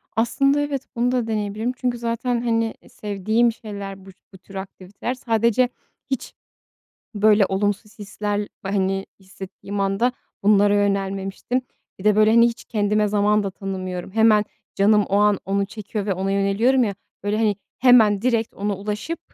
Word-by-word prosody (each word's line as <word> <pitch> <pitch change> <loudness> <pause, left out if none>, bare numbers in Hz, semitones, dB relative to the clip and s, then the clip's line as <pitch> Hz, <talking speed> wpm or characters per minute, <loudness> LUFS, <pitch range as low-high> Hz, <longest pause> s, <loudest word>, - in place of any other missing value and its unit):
Aslında, 275 +5 +2
evet, 285 -2 -3
bunu 240 +1 +1
da 245 -3 0
deneyebilirim. 215 +2 -2
Çünkü 245 -1 -1
zaten, 235 +1 -1
hani, 230 -1 0 0.2
sevdiğim 215 +3 0
şeyler 200 -3 -8
bu - - -12 0.2
bu - - -11
tür 195 +2 -16
aktiviteler. 190 +4 -6
Sadece 235 0 +1 0.4
hiç 265 - -3 0.8
böyle 210 -1 +4
olumsuz 205 +3 -2
hisler, 205 0 -3
hani, 195 -1 -1
hissettiğim 190 +1 -7
anda 195 +6 +1 0.3
bunlara 205 0 +4
yönelmemiştim. 195 +4 -1 0.4
Bir 190 - -11
de, 210 -1 +4
böyle, 215 0 +5
hani, 235 +1 +6
hiç 230 - -7
kendime 210 -1 +1
zaman 210 +1 +2
da 195 - -3
tanımıyorum. 185 -2 -5
Hemen, 220 -1 +4 0.3
canım 210 +1 +4
o 195 - 0
an 205 -1 +4
onu 200 +1 0
çekiyor 210 0 -5
ve 195 - 0
ona 190 +2 -2
yöneliyorum 200 +7 +2
ya, 205 -3 -2 0.3
böyle, 205 +1 0
hani, 215 -2 +1 0.2
hemen, 220 -5 +5
direkt 230 -2 0
ona 200 0 -2
ulaşıp 210 - -4
210 Hz, 150 wpm, -22 LUFS, 195-230 Hz, 0.8 s, hani